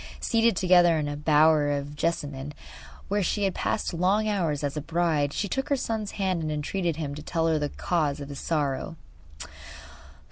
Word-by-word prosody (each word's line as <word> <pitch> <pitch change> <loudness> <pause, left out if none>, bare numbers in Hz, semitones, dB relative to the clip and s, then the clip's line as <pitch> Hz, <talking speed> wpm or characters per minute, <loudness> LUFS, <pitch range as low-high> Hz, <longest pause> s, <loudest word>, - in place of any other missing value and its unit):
Seated 230 -2 +2
together 175 -2 +5
in 150 -1 -1
a 145 - -3
bower 150 0 +4
of 145 0 -3
jessamine 145 -3 -3 0.5
where 205 +1 0
she 205 +3 0
had 195 -2 +1
passed - - -2
long 190 +5 +2
hours 170 -9 0
as 145 0 -2
a 150 - -2
bride 160 -2 0
she 205 - -2
took 270 +7 -2
her 285 - +3
son's 220 -5 -3
hand 190 -4 -1
and 155 -1 -2
entreated 165 +3 -1
him 145 -3 -4
to 150 - -7
tell 165 +1 -1
her 160 -1 +2
the 145 -1 -1
cause 150 -5 -1
of 140 0 -7
his 140 - -7
sorrow. 150 -1 -1
160 Hz, 185 wpm, -26 LUFS, 145-185 Hz, 0.5 s, together